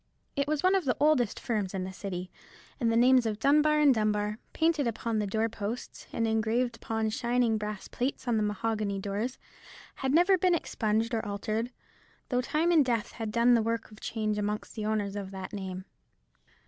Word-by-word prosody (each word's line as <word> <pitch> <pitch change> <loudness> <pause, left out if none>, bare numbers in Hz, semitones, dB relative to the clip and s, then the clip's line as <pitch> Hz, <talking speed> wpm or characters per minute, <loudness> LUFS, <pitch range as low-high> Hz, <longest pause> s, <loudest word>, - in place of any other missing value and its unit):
It 280 -1 0
was 300 -1 0
one 370 +1 +5
of 380 -4 +2
the 250 - +1
oldest 285 -7 +3
firms 210 -6 -2
in 185 - -2
the 190 +1 -6
City; 185 -2 -5 0.5
and 230 -3 +2
the 230 - +2
names 250 0 +5
of 215 -1 -2
Dunbar 300 +5 +4
and 290 -3 +6
Dunbar, 210 -1 0
painted 320 -4 +1
upon 230 -1 -1
the 210 - -1
door 220 +3 +1
posts, 220 +2 -6
and 230 -1 0
engraved 225 +2 0
upon 220 -1 -2
shining 240 -2 +1
brass 210 -1 -5
plates 260 +1 -3
on 240 - +2
the 215 - +2
mahogany 210 -1 -1
doors, 205 +6 -3 0.6
had 265 -1 -1
never 355 +5 +5
been 360 -1 +4
expunged 225 -5 -1
or 225 - 0
altered: 215 +3 -2 0.6
though 250 -1 +1
time 315 +6 +1
and 320 -4 +6
death 235 -4 -1
had 225 -2 -5
done 235 +2 +4
their 235 - +4
work 230 0 -2
of 215 - -13
change 215 -2 -2
amongst 210 +1 -3
the 215 -2 -3
owners 205 -2 -1
of 200 -2 -4
that 190 0 -7
name. 190 -2 -5
225 Hz, 195 wpm, -29 LUFS, 210-255 Hz, 0.6 s, and